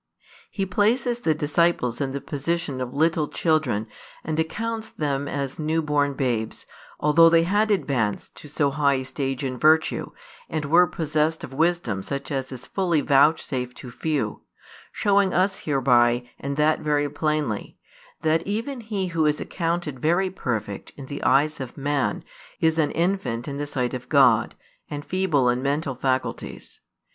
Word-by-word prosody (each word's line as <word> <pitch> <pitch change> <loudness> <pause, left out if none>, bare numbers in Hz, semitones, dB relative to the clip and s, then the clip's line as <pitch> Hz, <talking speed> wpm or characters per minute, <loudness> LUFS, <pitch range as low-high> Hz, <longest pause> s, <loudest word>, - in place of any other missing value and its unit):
He 195 - -2
places 230 +5 +1
the 160 -9 +1
disciples 150 -5 +1
in 135 -1 -1
the 140 +1 -4
position 145 -2 -2
of 125 -1 -3
little 155 +1 +1
children 150 -12 0 0.4
and 155 0 -2
accounts 225 +7 -2
them 145 -2 -2
as 140 0 -4
new 160 +1 0
born 145 -1 +1
babes, 120 -5 -2 0.3
although 165 +3 +6
they 165 0 +5
had 205 +5 +2
|212 - - +5
advanced 125 - -2
to - - -10
so 145 -1 +1
high 140 -1 +2
a 130 - -2
stage 135 0 -3
in 130 -2 -3
virtue, 160 +1 +3 0.4
and 155 -2 -2
were 170 +5 +5
possessed 155 0 -1
of 135 - -7
wisdom 160 - 0
such 140 +8 -5
as 135 -1 -3
is 130 - -8
fully 175 -6 0
vouchsafed 135 -3 +2
to 125 - -9
few; 140 -6 -2 0.5
showing 200 -2 +2
us 190 +2 +2
hereby, 125 -4 +2
and 140 0 -4
that 155 +1 +3
very 145 -1 +1
plainly, 150 -6 -2 0.5
that 160 +1 +3
even 230 +6 -3
he 210 -4 -2
who 160 -2 +1
is 150 0 +1
accounted 165 -5 -2
very 175 +6 +1
perfect 110 - -4
in 140 - -8
the 140 +1 -6
eyes 150 +4 +3
of 130 -2 -7
man 145 -1 -1 0.4
is 160 0 +2
an 150 - +3
infant 170 -10 -1
in 140 -1 -4
the 145 0 -3
sight 125 -3 -2
of 125 -1 -6
God, - - +4 0.3
and 145 0 -5
feeble 175 -9 +1
in 125 +1 +1
mental 140 +1 -1
faculties. 130 +1 -3
150 Hz, 165 wpm, -24 LUFS, 135-165 Hz, 0.5 s, although